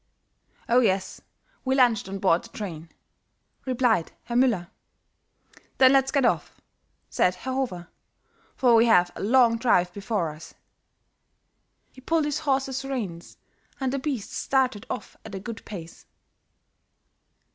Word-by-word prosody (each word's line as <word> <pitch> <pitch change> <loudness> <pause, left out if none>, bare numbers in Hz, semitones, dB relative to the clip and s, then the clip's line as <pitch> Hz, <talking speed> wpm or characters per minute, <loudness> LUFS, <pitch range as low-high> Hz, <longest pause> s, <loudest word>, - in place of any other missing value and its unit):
"Oh, 240 +2 +4
yes, 195 -5 0 0.4
we 265 0 +1
lunched 235 -7 +3
on 195 - -4
board 185 -3 +2
the 230 - -12
train," 170 -8 -7 0.8
replied 245 -9 +1
Herr 235 - -5
Müller. 230 -9 +2 1.1
"Then, 260 0 +6
let's 270 -1 +3
get 280 -3 +2
off," - - -1 0.5
said 180 - +1
Herr 260 +7 -5
Hofer, 225 -11 -3 0.7
"for 250 -2 +3
we 230 +1 +5
have 180 -5 +4
a - - -7
long 230 +1 +4
drive 180 -7 +2
before 200 -5 -2
us." 155 +2 -13 1.4
He 260 - -15
pulled 320 +3 +1
his 295 0 -1
horses' 270 -2 -1
reins 215 -11 -5 0.4
and 265 -1 -1
the 275 - -1
beasts 260 -6 -4
started 255 -6 0
off 250 - -6
at 220 -3 -9
a - - -4
good 225 +3 -8
pace. 170 -6 -10
230 Hz, 135 wpm, -25 LUFS, 190-260 Hz, 1.4 s, Then